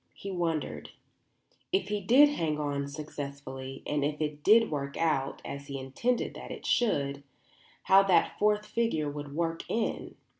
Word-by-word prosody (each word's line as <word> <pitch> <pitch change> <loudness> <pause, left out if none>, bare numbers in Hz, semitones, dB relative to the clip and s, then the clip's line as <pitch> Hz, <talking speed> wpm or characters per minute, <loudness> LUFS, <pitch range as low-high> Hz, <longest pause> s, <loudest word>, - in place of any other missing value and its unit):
He 200 - -6
wondered, 170 -4 -2 0.8
if 380 - +1
he 210 -1 -1
did 260 +9 +7
hang 160 - -1
on 140 -1 -2
successfully 140 -2 -7
and 150 -1 0
if 150 +1 -1
it 150 -1 -3
did 225 0 +6
work 140 -1 -3
out 140 -5 0
as 140 0 -6
he 140 - -5
intended 135 - -1
that - - -9
it - - -8
should, 140 - +1 0.6
how 195 +1 +7
that 195 -2 +2
fourth 210 0 +2
figure 185 -13 0
would 145 -1 -7
work 165 0 -1
in. 225 0 -2
155 Hz, 155 wpm, -29 LUFS, 140-205 Hz, 0.8 s, did